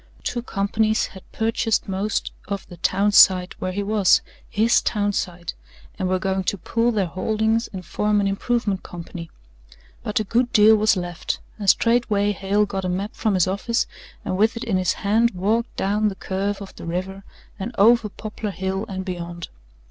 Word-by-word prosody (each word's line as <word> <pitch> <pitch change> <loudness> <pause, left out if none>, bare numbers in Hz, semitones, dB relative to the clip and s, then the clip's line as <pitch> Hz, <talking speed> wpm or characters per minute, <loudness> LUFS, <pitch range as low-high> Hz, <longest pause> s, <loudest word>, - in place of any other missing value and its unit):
Two 240 - -2
companies 215 0 0
had 190 - -13
purchased 225 0 0
most 195 +2 -2 0.2
of 200 -1 -4
the 175 - -10
town 195 +4 +2
site 185 -2 +6
where 185 - -1
he 200 +2 -2
was 205 -2 +3 0.3
HIS 225 +1 +3
town 205 -1 0
site 175 -3 -3 0.5
and 185 -1 0
were 185 - +2
going 190 0 -1
to 200 - 0
pool 230 +6 0
their 205 -4 +1
holdings 220 +5 0
and 185 -2 -8
form 210 +5 +1
an 200 - +1
improvement 200 0 0
company. 170 -1 -8 0.7
But 210 - -1
a - - 0
good 240 +4 +1
deal 220 -2 +7
was 215 -1 +3
left, 175 -1 -3 0.2
and 200 -2 +1
straightway 220 -3 +3
Hale 200 +1 +1
got 195 -1 -4
a 185 - -1
map 195 +4 -3
from 215 -3 0
his 180 - +4
office 210 +6 0 0.4
and 185 - -1
with 220 +3 +2
it - - -4
in 210 -5 0
his 185 -1 +1
hand 225 +3 +3
walked 220 +6 0
down 210 +2 +1
the 200 - -2
curve 200 +2 -3
of 195 - -12
the - - -8
river 190 +3 -4 0.4
and 195 +5 -4
over 225 +1 +5
Poplar 215 +1 -6
Hill 190 +2 -3
and 190 -1 -4
beyond. 175 -2 -6
200 Hz, 185 wpm, -23 LUFS, 190-220 Hz, 0.7 s, deal